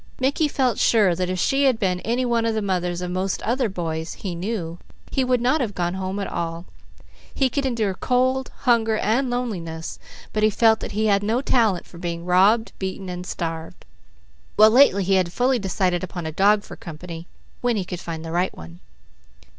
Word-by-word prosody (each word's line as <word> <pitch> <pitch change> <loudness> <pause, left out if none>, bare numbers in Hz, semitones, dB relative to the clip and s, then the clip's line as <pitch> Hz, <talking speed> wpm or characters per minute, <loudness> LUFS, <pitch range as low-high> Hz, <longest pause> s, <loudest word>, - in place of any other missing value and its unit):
Mickey 275 +4 +2
felt 255 -6 0
sure 210 -6 +4
that 180 +1 -2
if 185 - -2
she 270 +9 +2
had 260 -4 +3
been 185 -4 0
any 240 +6 -1
one 235 -1 +1
of 225 - 0
the 220 - 0
mothers 180 -2 -1
of 180 0 -3
most 185 +1 -1
other 240 0 0
boys 165 -3 -4
he 190 -3 -5
knew, 175 -2 -4 0.3
he 265 - +1
would 250 -1 +2
not 260 +5 +2
have 210 -5 -2
gone 175 0 -1
home 190 +1 -3
at 200 - -2
all. 170 0 -4 0.7
He 265 -2 +2
could 280 -2 0
endure 220 -6 0
cold, 255 +5 0
hunger, 225 -4 +3
and 240 +6 +1
loneliness, 180 -10 -4 0.3
but 215 - 0
he 215 - +5
felt 220 +1 +4
that - - -6
he 215 +2 0
had 200 -2 +3
no 220 +4 +1
talent 225 -9 +1
for 170 - -13
being 170 -1 -4
robbed, 195 +6 +4
beaten, 190 0 -4
and 180 0 -6
starved; 165 -1 -5 0.7
while 215 +1 +7
lately 230 -6 +5
he 195 +2 +1
had 185 -2 +2
fully 250 +5 +1
decided 185 -2 0
upon 175 -2 -5
a 160 - -3
dog 200 +5 +3
for - - -10
company, 165 0 -9 0.3
when 245 -1 +1
he 190 - -2
could 180 -1 -6
find 165 -2 -6
the 165 - -5
right 180 +2 -1
one. 85 +1 -11
195 Hz, 200 wpm, -23 LUFS, 175-235 Hz, 0.7 s, while